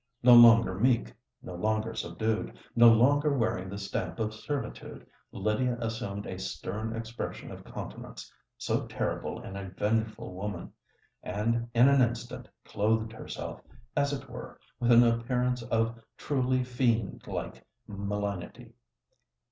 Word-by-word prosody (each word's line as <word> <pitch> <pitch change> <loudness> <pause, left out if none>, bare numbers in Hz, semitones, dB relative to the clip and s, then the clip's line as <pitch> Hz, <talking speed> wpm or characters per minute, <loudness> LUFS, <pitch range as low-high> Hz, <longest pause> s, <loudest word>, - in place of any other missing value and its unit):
No 125 0 +8
longer 115 -4 +8
meek—no 115 -2 -1
longer 110 +4 -1
subdued—no 110 +1 +2
longer 140 +5 +4
wearing 95 -6 -1
the 100 - -6
stamp 100 -1 -4
of 110 -1 -1
servitude 140 +6 -5 0.3
Lydia 110 +5 0
assumed 110 -3 -4
a 95 - -6
stern 110 +4 -4
expression 115 +1 -6
of - - -9
countenance—so - - -6
terrible - - -3
in 95 - -8
a 100 -1 -6
vengeful 110 0 -1
woman—and 105 +4 -4
in 120 +3 +7
an 140 -1 +5
instant 120 0 -2 0.2
clothed 110 +2 0
herself, - - -7 0.3
as 140 -1 +2
it 140 - -5
were, - - -9 0.2
with 120 0 +2
an 120 0 +8
appearance 125 +1 +1
of 115 -1 0 0.2
truly 130 -2 0
fiend 120 -4 0
like - - -5 0.2
malignity. 100 -2 -4
115 Hz, 120 wpm, -29 LUFS, 105-120 Hz, 0.3 s, No